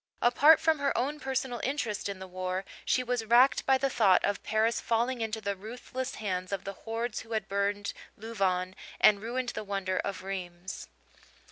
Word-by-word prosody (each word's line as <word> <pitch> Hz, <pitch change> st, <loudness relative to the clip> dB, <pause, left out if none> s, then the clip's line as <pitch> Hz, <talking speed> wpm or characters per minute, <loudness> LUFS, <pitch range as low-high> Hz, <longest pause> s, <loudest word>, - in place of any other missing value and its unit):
Apart 290 Hz, +6 st, +7 dB
from 320 Hz, -2 st, +2 dB
her 280 Hz, 0 st, 0 dB
own 290 Hz, +5 st, -1 dB
personal 265 Hz, -3 st, -2 dB
interest 240 Hz, -7 st, -2 dB
in 200 Hz, -, -4 dB
the 190 Hz, -, -8 dB
war, 185 Hz, +1 st, -3 dB, 0.2 s
she 255 Hz, -, +2 dB
was 245 Hz, -2 st, -1 dB
racked 240 Hz, +4 st, +5 dB
by 265 Hz, 0 st, +5 dB
the 275 Hz, -, +1 dB
thought 215 Hz, -8 st, +4 dB
of 205 Hz, -, -1 dB
Paris 220 Hz, +2 st, +1 dB
falling 235 Hz, +2 st, 0 dB
into 220 Hz, 0 st, -2 dB
the 200 Hz, -2 st, -2 dB
ruthless 245 Hz, +5 st, -6 dB
hands 185 Hz, -3 st, -3 dB
of 195 Hz, -2 st, -2 dB
the 195 Hz, -, -5 dB
hordes 225 Hz, +2 st, -4 dB
who 225 Hz, 0 st, -8 dB
had 215 Hz, -3 st, -1 dB
burned 200 Hz, 0 st, -1 dB, 0.2 s
Louvain 190 Hz, -4 st, -1 dB, 0.2 s
and 205 Hz, -1 st, +6 dB
ruined 245 Hz, +3 st, -2 dB
the -, -, -4 dB
wonder 195 Hz, -2 st, -2 dB
of 195 Hz, -2 st, -4 dB
Rheims. 185 Hz, -1 st, -6 dB
220 Hz, 180 wpm, -30 LUFS, 195-245 Hz, 0.2 s, Apart